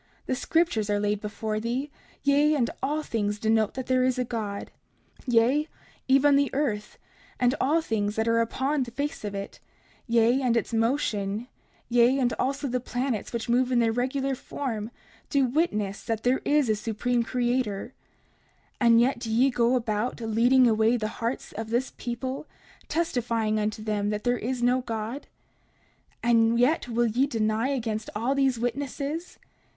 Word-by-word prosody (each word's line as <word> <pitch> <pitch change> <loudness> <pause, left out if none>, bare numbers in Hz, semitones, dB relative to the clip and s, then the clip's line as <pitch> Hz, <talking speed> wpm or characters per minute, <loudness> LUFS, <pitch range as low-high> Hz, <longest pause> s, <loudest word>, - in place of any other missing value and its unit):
The - - -1
scriptures 255 -6 +1
are 205 0 +1
laid 205 0 0
before 215 0 -3
thee, 250 +6 -3 0.3
yea, 290 +2 +4
and 245 -5 +1
all 300 +3 -1
things 210 -4 -1
denote 220 0 +1
there 255 0 +1
is 255 0 +1
a 250 - +1
God; 215 -4 -4 0.6
yea, 250 +6 +3 0.4
even 275 +2 +5
the 280 0 +3
earth, 215 -8 -2 0.4
and 250 0 +3
all 310 +5 +3
things 210 -5 -1
that 220 +1 0
are 230 0 +3
upon 270 +5 0
the 250 - -2
face 285 +3 -4
of 205 -1 -4
it, 195 0 -6 0.5
yea, 235 +2 +3
and 240 -3 +2
its 230 - -2
motion, 225 -3 0 0.4
yea, 245 +2 +4
and 245 -3 +1
also 275 +3 -1
all 265 - -2
the 250 - 0
planets 245 -2 -3
which 235 -1 -3
move 250 +2 +2
in 250 - +3
their 230 -1 +3
regular 265 +3 -1
form 245 -5 -4 0.4
do 280 -3 +3
witness 215 - 0
that 225 -2 -3
there 250 +2 +2
is 295 -2 +3
a 220 - +3
Supreme 235 +3 -1
Creator. 240 -2 -1 0.9
30:45 240 - +4
And 230 0 +7
yet 245 +1 +2
do 235 -2 -5
ye 255 +5 +4
go 240 +1 +2
about, 225 0 -1
leading 235 +3 +4
away 220 +1 +3
the 215 -2 -2
hearts 235 +3 -3
of 220 +1 -6
this 240 +3 -1
people, 255 +4 -4 0.4
testifying 235 -9 0
unto 215 0 -2
them 210 -1 -1
there 225 +3 0
is 245 +2 -3
no 250 +1 +3
God? 230 +3 -5 1.0
And 230 0 +4
yet 255 +3 +2
will 240 0 +1
ye 240 +5 +2
deny 220 -1 0
against 225 -5 -2
all 235 +6 0
these 270 -3 +2
witnesses? 280 +7 -3
240 Hz, 165 wpm, -26 LUFS, 220-265 Hz, 1.0 s, And